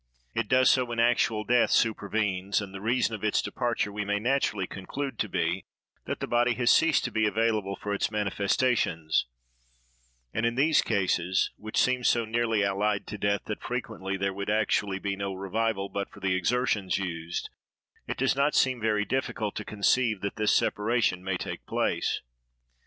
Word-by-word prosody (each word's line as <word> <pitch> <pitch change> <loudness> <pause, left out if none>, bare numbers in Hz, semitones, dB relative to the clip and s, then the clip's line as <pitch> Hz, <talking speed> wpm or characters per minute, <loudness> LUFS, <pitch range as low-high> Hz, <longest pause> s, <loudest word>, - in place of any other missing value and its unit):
It 115 -1 -1
does 130 +2 +5
so 130 - +3
when 120 -1 -4
actual 115 -2 +2
death 120 +3 +3
supervenes, 100 -3 +1
and 100 -2 -7
the 95 - -7
reason 115 +1 +1
of 110 - -6
its 105 - +2
departure 120 -3 -1
we 105 +1 -3
may 100 0 0
naturally 110 -4 0
conclude 135 +10 -5
to 105 - -1
be, 90 0 -1 0.4
that - - -3
the - - -2
body 120 0 +2
has 125 -1 +4
ceased 165 -2 +4
to - - -2
be 110 -1 +2
available 105 -2 0
for 105 +1 -4
its 100 - 0
manifestations; 100 - +1 1.1
and 115 - -1
in 115 0 +1
these 150 +4 +4
cases, 95 -3 +1
which 110 0 -7
seem 125 -1 +2
so 120 -1 +3
nearly 115 -1 +1
allied 100 +1 0
to 105 - -7
death, 100 0 +1
that 105 - -5
frequently 110 -6 -4
there 100 0 -1
would 100 +1 -4
actually 105 -2 +1
be 100 0 -2
no 100 -1 -4
revival 100 +1 -1
but 100 0 -4
for - - -14
the 95 -1 0
exertions 100 +1 +1
used, 85 -3 -4 0.6
it - - -3
does 135 +1 +2
not 140 +2 +2
seem 130 -3 +2
very 105 -1 +1
difficult 115 -5 -2
to 105 - -4
conceive 110 +1 +1
that 100 0 -3
this 105 -1 +2
separation 105 -4 +1
may 95 -1 -1
take - - -6
place. - - 0
105 Hz, 180 wpm, -28 LUFS, 100-120 Hz, 1.1 s, does